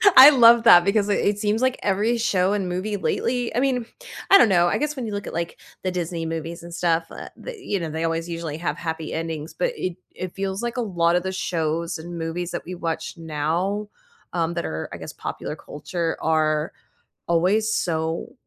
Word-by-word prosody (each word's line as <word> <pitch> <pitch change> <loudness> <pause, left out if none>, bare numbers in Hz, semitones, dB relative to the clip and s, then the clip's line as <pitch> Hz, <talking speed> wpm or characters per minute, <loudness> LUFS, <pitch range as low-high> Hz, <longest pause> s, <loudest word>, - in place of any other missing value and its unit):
I 265 +3 +12
love 235 -3 +7
that 175 -5 +8
because 205 0 +2
i - - +3
it 205 +1 +1
seems 215 +2 0
like 260 0 +1
every 210 +4 +1
show 195 -3 +2
and 195 -3 -1
movie 190 +4 -2
lately 240 +4 -1
I - - +2
mean, 255 -3 +1 0.4
I 395 - +10
don't 230 - +6
know, 175 -2 +4
I - - +1
guess 300 0 -1
when 245 -4 -4
you 210 - -4
look 205 - -4
at, - - -6
like, 170 +1 -4 0.2
the 185 - 0
Disney 170 -2 -3
movies 165 +1 -4
and 170 0 -10
stuff, 165 -1 +1
uh, - - -8
the - - -8
you 205 - -2
know, 165 -2 -3
they 160 +2 -3
always 165 +1 -1
usually 165 -2 -4
have 160 -2 -2
happy 160 -1 -4
endings, 160 -1 -4
but - - 0
it 185 - -3 0.2
it 185 -1 -6
feels 195 +1 -3
like 240 +1 -3
a - - +1
lotta 175 -4 +2
the 190 +1 -3
shows 165 -2 -2
and 170 +2 -8
movies 165 +2 -3
that - - -3
we 180 +1 -6
watch 165 -2 -4
now, 165 +6 -1 0.5
um, 170 -1 0
that 170 - -2
are, 80 - -4
I - - -5
guess, - - -8
popular - - -5
culture 165 +3 -4
are 155 -1 +1 0.6
always 190 +6 +2
so 165 +7 -2
175 Hz, 210 wpm, -23 LUFS, 165-210 Hz, 0.6 s, I